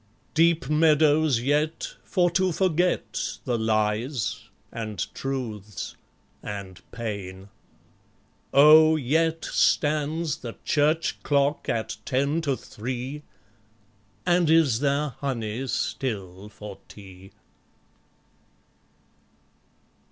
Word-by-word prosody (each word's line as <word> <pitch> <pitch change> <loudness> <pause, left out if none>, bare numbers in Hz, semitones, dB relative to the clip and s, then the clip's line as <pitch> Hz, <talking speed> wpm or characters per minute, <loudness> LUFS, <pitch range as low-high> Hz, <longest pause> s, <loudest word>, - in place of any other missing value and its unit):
Deep 165 -2 +3
meadows 150 -3 +3
yet, 150 +5 0
for 175 -3 +1
to 185 +1 +2
forget 180 +1 0
The 125 -3 0
lies, 110 +2 -1 0.3
and 110 -3 -5 0.2
truths, 110 -7 -5 0.5
and 100 -3 -7
pain?... 100 -4 -6 1.0
oh! 155 +2 +7
yet 160 +4 0
Stands 155 +1 +1
the 115 -2 -8
Church 155 +2 +1
clock 145 +1 +1
at 115 -1 -2
ten 140 +5 0
to 140 -5 -1
three? 130 +5 -6 1.0
And 175 -2 +3
is 155 -8 +4
there 145 +1 +1
honey 125 -2 -3
still 100 -7 -3
for 105 -2 -10
tea? 95 -1 -13
140 Hz, 85 wpm, -25 LUFS, 110-155 Hz, 1.0 s, oh